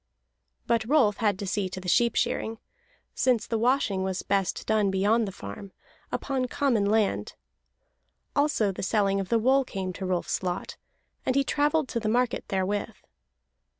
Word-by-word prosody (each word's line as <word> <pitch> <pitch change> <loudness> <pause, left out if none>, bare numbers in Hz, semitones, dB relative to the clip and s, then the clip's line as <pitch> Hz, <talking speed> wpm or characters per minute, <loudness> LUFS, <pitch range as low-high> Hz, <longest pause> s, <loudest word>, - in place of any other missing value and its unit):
But 230 -1 +2
Rolf 230 -6 +3
had 210 -4 +1
to 200 - -5
see 190 0 -1
to 185 - -6
the 185 - -9
sheep 235 +5 +3
shearing, 225 +1 -1 0.6
since 250 -4 +2
the 225 - -1
washing 235 -5 +2
was 190 0 -2
best 195 -2 -1
done 215 -2 +2
beyond 205 +4 +2
the - - -4
farm, 140 - -9 0.4
upon 265 -2 -1
common 245 -7 +1
land. 205 - +1 1.0
Also 285 -8 +2
the 190 - -7
selling 195 -1 +1
of 195 -1 -4
the 230 - +3
wool 260 +4 +3
came 190 -6 -4
to 190 - -5
Rolf's 180 -2 -1
lot, 180 0 -3 0.5
and 255 - 0
he 275 - +4
travelled 295 +1 +1
to 235 - -1
the 215 -1 -1
market 245 +2 +1
therewith. 205 +3 -1
215 Hz, 165 wpm, -27 LUFS, 190-245 Hz, 1.0 s, he